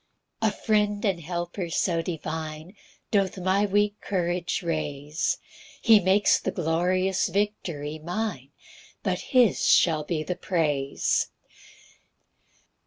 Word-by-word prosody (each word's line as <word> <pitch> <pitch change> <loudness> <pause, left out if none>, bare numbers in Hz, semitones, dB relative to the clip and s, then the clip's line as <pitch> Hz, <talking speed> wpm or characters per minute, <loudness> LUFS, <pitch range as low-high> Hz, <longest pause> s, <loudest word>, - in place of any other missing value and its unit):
3 220 - +4
A - - -4
friend 210 0 0
and 190 -4 +1
helper 175 +2 -4
so 165 0 +1
divine 160 +1 -5 0.4
Doth 195 -3 +1
my 190 +3 +2
weak 205 +1 +1
courage 175 -1 -1
raise; 150 -2 -2 0.4
He 225 -3 +6
makes 195 +2 +4
the - - -2
glorious 180 +3 +1
victory 170 -6 -2
mine, 175 - -4 0.6
And - - 0
his 250 -7 +3
shall 155 -3 +4
be 155 0 -2
the 180 - -3
praise. 150 -7 0
175 Hz, 110 wpm, -26 LUFS, 160-200 Hz, 0.6 s, He